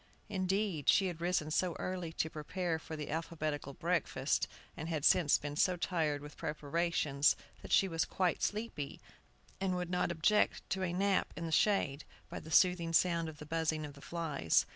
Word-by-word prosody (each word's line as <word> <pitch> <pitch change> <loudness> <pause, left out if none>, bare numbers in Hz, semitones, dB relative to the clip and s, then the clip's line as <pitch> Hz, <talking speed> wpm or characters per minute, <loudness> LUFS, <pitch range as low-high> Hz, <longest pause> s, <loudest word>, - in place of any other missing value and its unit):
Indeed, 190 -5 0
she 195 - +5
had 175 -3 -4
risen 170 -3 0
so 175 +2 +1
early 180 -3 -3
to 160 - -1
prepare 165 +2 -2
for 160 - -7
the 150 -2 -5
alphabetical 155 -3 -3
breakfast, 165 -5 0 0.3
and 160 +2 -5
had 155 -4 -1
since 170 -6 +5
been 145 0 -5
so 180 +4 +3
tired 155 -5 0
with 150 -1 -10
preparations, 150 -1 +1 0.3
that - - -10
she 195 - +5
was 165 -2 0
quite 180 -3 0
sleepy, 210 -10 -3 0.6
and 190 -1 0
would 180 -1 -3
not 180 -1 +1
object 175 +6 +2
to 190 - 0
a 180 -2 0
nape 195 +2 +1
in 170 - -3
the 165 - -4
shade, 155 -4 +2 0.3
by - - -4
the 160 - -11
soothing 175 -1 +4
sound 170 -1 +3
of 155 - -10
the 150 - -9
buzzing 160 0 -1
of 145 - -8
the 140 - -14
flies. 150 - +1
165 Hz, 185 wpm, -34 LUFS, 150-180 Hz, 0.6 s, she